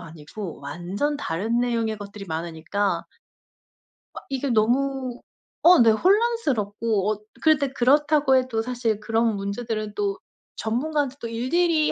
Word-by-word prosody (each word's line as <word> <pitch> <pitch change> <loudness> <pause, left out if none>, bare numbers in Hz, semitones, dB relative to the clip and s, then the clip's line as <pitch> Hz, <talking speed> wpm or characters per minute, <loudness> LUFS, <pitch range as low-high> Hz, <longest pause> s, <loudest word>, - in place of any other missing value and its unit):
아니고 165 +3 -8
완전 185 - -3
다른 220 - -1
내용의 230 -3 -1
것들이 200 0 -8
많으니까 170 +4 -2 1.1
막 - - -10
이게 275 0 -2
너무 250 +2 +1 0.4
어 350 -1 +8
네 230 -1 +7
혼란스럽고 230 - +1
어 210 - -10 0.2
그런데 295 -4 +3
그렇다고 285 +2 +3
해도 255 -3 +1
사실 235 -3 -1
그런 225 0 +1
문제들은 215 +1 -4
또 200 -1 -1 0.4
전문가한테 280 +4 -1
또 230 - -3
일일이 305 +7 +1
230 Hz, 285 characters per minute, -24 LUFS, 205-275 Hz, 1.1 s, 어